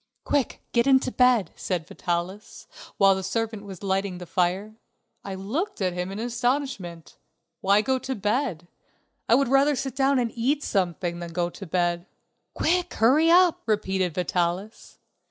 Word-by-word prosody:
"Quick, 280 -5 -1
get 235 +2 +2
into 265 -1 +4
bed," 250 -9 +3
said 175 -4 -3
Vitalis, 175 +5 -4 0.3
while 195 -1 +6
the 190 - -3
servant 215 +2 -3
was 195 -1 -10
lighting 195 -1 -1
the 180 - -8
fire. 185 +5 -1 0.5
I 195 -1 -5
looked 275 - -3
at 185 -3 0
him 180 +1 -3
in 195 - -6
astonishment. 240 - -3 0.4
Why 200 +2 +4
go 260 +3 +1
to 265 +1 -4
bed? 210 - -1 0.6
I 230 - +7
would 275 +1 +2
rather 275 +3 +4
sit 270 0 -4
down 275 0 +3
and 240 -2 0
eat 275 +6 0
something 175 -3 -1
than 170 -1 -7
go 175 0 -1
to 195 - -9
bed. 175 +1 0 0.5
"Quick, 355 +2 0
hurry 280 +9 +4
up," 355 0 +5
repeated 190 -5 0
Vitalis. 180 +3 -2
205 Hz, 155 wpm, -25 LUFS, 180-260 Hz, 0.6 s, I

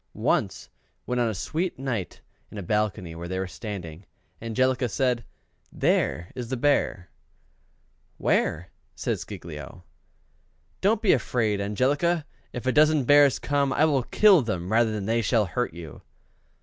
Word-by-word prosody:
Once - - 0 0.4
when 125 0 -1
on 120 -2 +2
a - - -2
sweet 165 - -2
night 125 -8 -4 0.3
in - - -10
a 100 - -5
balcony 105 -3 -1
where 85 +1 -7
they 95 +1 -3
were 95 - -1
standing, 90 -4 -7 0.4
Angelica 125 +2 0
said, 125 +2 0 0.5
"There 85 +2 0
is 120 -2 -6
the 130 - -2
Bear" 120 -9 0 1.1
"Where?" 85 +2 0 0.2
says - - -2
Giglio. 75 +1 -9 1.0
"Don't 210 +3 +2
be 205 - +5
afraid, 110 -4 0
Angelica! 145 +11 +1 0.3
if 125 0 -6
a 130 - +3
dozen 155 0 +4
bears 145 +1 +5
come, 140 -1 0
I 150 +3 +3
will 145 -4 +2
kill 195 - +5
them 95 -6 -3
rather 115 0 +3
than 105 -2 -3
they 115 +2 +1
shall 110 0 +2
hurt 125 -2 -3
you." 80 -4 -10
115 Hz, 150 wpm, -26 LUFS, 95-140 Hz, 1.1 s, be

